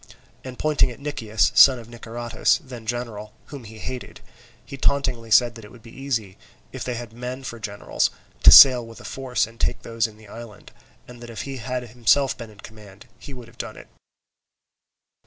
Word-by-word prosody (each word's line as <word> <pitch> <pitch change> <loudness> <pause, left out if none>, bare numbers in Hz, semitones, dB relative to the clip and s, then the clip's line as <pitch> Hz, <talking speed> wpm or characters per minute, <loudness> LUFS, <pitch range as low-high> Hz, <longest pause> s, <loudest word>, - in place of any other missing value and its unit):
And 130 -1 -9
pointing 155 -3 +2
at 120 - -11
Nicias, 110 -9 -1
son 135 -2 +7
of 115 -2 -11
Niceratus, 120 +2 -1
then 125 -5 -11
general, 110 -3 -5 0.2
whom 135 -5 -9
he 110 +1 -12
hated, 125 +5 -7 0.5
he - - -9
tauntingly 130 -4 -1
said 120 +2 +4
that 115 0 -12
it 105 - -12
would 120 -3 -16
be 115 - -14
easy, 115 -8 -4 0.3
if - - -6
they 125 - -4
had 120 -1 -8
men 125 +3 -7
for 120 -2 -7
generals, 100 -2 -2 0.3
to - - +9
sail 125 -3 +10
with 115 0 -12
a - - -13
force 130 -3 -2
and 115 +1 -17
take - - -1
those 115 0 -1
in 110 -1 -16
the 110 -1 -17
island, 115 0 -12 0.4
and 120 -1 -13
that 120 - -10
if 115 - -6
he 135 -1 -6
had 125 +1 -4
himself 125 +3 +1
been 115 -3 -10
in 105 -2 -16
command, 105 -1 -14
he 140 - -11
would 125 -3 -11
have - - -20
done - - -6
it. - - -14
120 Hz, 200 wpm, -23 LUFS, 110-130 Hz, 0.5 s, sail